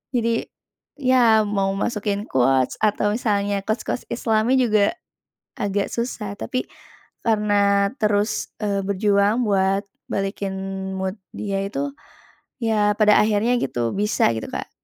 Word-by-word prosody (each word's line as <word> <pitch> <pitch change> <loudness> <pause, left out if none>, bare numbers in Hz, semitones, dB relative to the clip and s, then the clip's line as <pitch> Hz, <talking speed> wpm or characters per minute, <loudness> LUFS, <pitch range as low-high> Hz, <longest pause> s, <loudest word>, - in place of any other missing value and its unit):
Jadi, 230 -1 +1 0.6
ya 245 -5 +4
mau 195 -1 0
masukin 205 -1 -2
quotes 130 0 +2
atau 210 0 +2
misalnya 205 -3 0
quotes-quotes 220 +3 -2
islami 230 +2 +2
juga 215 -5 +3 0.7
agak 200 -2 0
susah. 230 -4 -3
Tapi 255 - -3 0.6
karena 205 -2 +2
terus, 210 +1 +1
eee, 200 -1 0
berjuang 200 +3 +2
buat 195 0 +2 0.3
balikin 195 0 -2 0.5
mood 190 0 -2 0.2
dia 195 -2 -2
itu, 275 +7 -3 0.7
ya 215 -2 +2
pada 210 -1 +5
akhirnya 215 +3 +2
gitu, 120 -3 -1
bisa 210 - +2
gitu, 110 - -5
Kak. - - -5
205 Hz, 115 wpm, -22 LUFS, 200-220 Hz, 0.7 s, pada